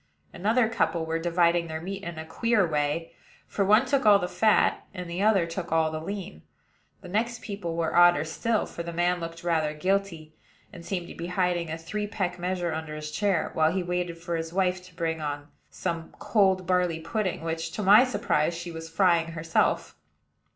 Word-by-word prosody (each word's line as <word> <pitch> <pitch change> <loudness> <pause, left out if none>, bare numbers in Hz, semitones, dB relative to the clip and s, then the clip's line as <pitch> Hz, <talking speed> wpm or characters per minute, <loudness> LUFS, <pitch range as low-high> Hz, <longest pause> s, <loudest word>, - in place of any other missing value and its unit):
Another 220 +6 +2
couple 170 -7 0
were 165 0 -1
dividing 170 0 +2
their 160 0 -4
meat 195 +4 -6
in 170 -4 -6
a 160 - -6
queer 215 +5 +1
way; 150 +1 -1 0.3
for 200 - -1
one 215 +6 +5
took 270 +1 +1
all 210 -2 +7
the 180 - -2
fat, 195 +5 +2
and 180 -2 -5
the 170 +2 -4
other 200 -5 +3 0.2
all 160 -1 +2
the 155 - -3
lean. 185 - -6 0.6
The - - -10
next 230 +5 -2
people 195 -5 -4
were 165 -1 -1
odder 175 -3 +6
still; 220 +7 0
for - - -7
the 170 0 -5
man 175 +1 +1
looked 165 0 -7
rather 160 -3 0
guilty, 185 -2 -1 0.4
and 175 -3 -10
seemed 175 -1 -3
to - - -8
be 170 - -6
hiding 180 -2 0
a 160 - -3
three 205 +6 -4
peck 185 -4 -3
measure 175 -2 -2
under 160 -1 -5
his 150 0 -6
chair, 195 0 0
while 160 0 +3
he 185 +1 -1
waited 175 -1 -2
for 170 0 -4
his 165 0 -4
wife 185 0 0
to 180 -2 -17
bring 160 -1 -2
on 145 0 -4 0.2
some 165 -1 -4
cold 190 -4 +2
barley 180 -2 +1
pudding, 190 +2 -2
which, 165 0 -3
to 210 - -3
my 205 +5 +8
surprise, 200 -9 0
she 170 +1 -6
was 165 0 -8
frying 165 -1 +2
herself. 165 0 0
175 Hz, 195 wpm, -27 LUFS, 165-195 Hz, 0.6 s, my